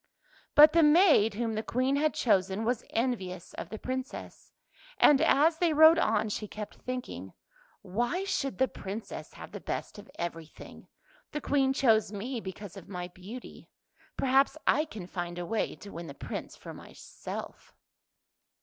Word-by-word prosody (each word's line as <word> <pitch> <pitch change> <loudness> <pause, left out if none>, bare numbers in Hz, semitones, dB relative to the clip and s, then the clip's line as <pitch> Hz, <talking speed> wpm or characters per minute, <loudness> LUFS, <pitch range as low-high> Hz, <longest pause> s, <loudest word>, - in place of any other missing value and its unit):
But 300 +1 +9
the 335 - +5
maid, 300 - +5
whom 225 0 -1
the 215 - -1
Queen 255 +4 0
had 305 +2 +1
chosen, 195 -1 +1
was 245 0 0
envious 195 -7 -2
of - - -7
the 220 - -6
Princess, 260 +3 -6 0.5
and 290 -1 +6
as 320 +1 +4
they 340 -3 +2
rode 315 +2 +7
on - - +2
she 210 +1 -4
kept 210 0 -7
thinking, 255 0 -6 0.3
" - - -32 0.2
Why 295 +11 +1
should 290 -9 -2
the 260 - +3
Princess 205 0 -7
have - - -10
the - - -7
best - - -5
of - - -13
every 165 -2 -4
thing? - - -13 0.5
The 300 - -3
Queen 270 -2 +2
chose 225 -6 +3
me 235 +5 -4
because 190 -1 -8
of 195 -1 -11
my 180 -2 -5
beauty; 200 +8 -11 0.5
perhaps 270 +3 +3
I 305 - +3
can 215 - -8
find 175 -1 -5
a 175 - -4
way 220 +5 -1
to 200 - -12
win 170 0 -7
the 140 - -9
Prince - - -6
for - - -10
myself." - - -9
235 Hz, 170 wpm, -29 LUFS, 195-280 Hz, 0.5 s, But